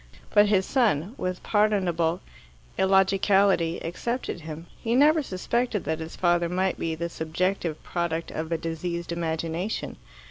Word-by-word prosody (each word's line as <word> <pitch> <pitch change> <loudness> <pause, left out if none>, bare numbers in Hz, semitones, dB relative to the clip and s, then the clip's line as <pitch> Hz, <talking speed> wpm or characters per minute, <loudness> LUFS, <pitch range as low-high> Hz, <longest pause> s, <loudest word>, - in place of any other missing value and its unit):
But 205 0 +6
his 195 -2 +3
son, 215 - +1
with 185 -5 -4
pardonable 185 -5 +1 0.5
illogicality, 190 -2 +3
excepted 235 +3 -3
him. 160 +1 -7 0.2
He 230 +1 0
never 305 +4 +5
suspected 235 - -1
that 160 +2 -2
his 160 0 -7
father 175 -1 +2
might 185 +1 0
be 165 -1 -1
the 170 +1 -3
subjective 170 0 -2
product 170 -1 -2
of 160 +1 -4
a 165 - +1
diseased 170 +1 -4
imagination. 165 +3 -3
175 Hz, 135 wpm, -26 LUFS, 165-200 Hz, 0.5 s, But